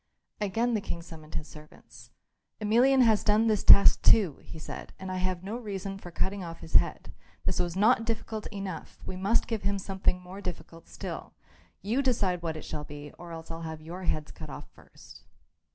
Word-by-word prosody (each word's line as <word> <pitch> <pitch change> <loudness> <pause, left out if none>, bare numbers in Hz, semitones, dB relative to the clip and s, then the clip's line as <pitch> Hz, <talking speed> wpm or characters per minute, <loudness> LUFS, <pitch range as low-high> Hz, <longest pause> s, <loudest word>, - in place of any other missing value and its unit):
Again 225 +4 +1
the 215 - +1
King 170 -3 -5
summoned 160 -2 -11
his 155 - -3
servants. 150 0 -14 0.5
"Emelian 245 +5 +5
has 220 -3 +4
done 215 +1 +4
this 215 -2 +2
task 200 - +8
too," 190 -10 +5
he - - -10
said, 155 - -8
"and 190 0 -6
I 185 - -2
have 185 -1 -1
no 205 +4 -4
reason 195 -4 -5
for 180 - -9
cutting 190 +3 -2
off 165 -1 -8
his 80 - -11
head. - - +2 0.3
This - - 0
was 175 -1 0
not 220 +4 +4
difficult 225 -1 -3
enough; 195 -5 -6
we - - -5
must 195 +5 +2
give 225 -3 -2
him 200 +1 0
something 190 -1 0
more 180 +2 -10
difficult 170 -3 -7
still. - - -7 0.5
You 230 +7 +1
decide 205 -9 +1
what 160 -2 -3
it - - -8
shall 150 - -5
be, 145 0 -9
or 175 -1 -9
else 165 0 -8
I'll 165 0 -5
have 160 -1 -5
your 175 +4 -7
heads 155 -2 -1
cut 80 - -9
off - - -8
first." - - -16
190 Hz, 200 wpm, -29 LUFS, 165-215 Hz, 0.5 s, task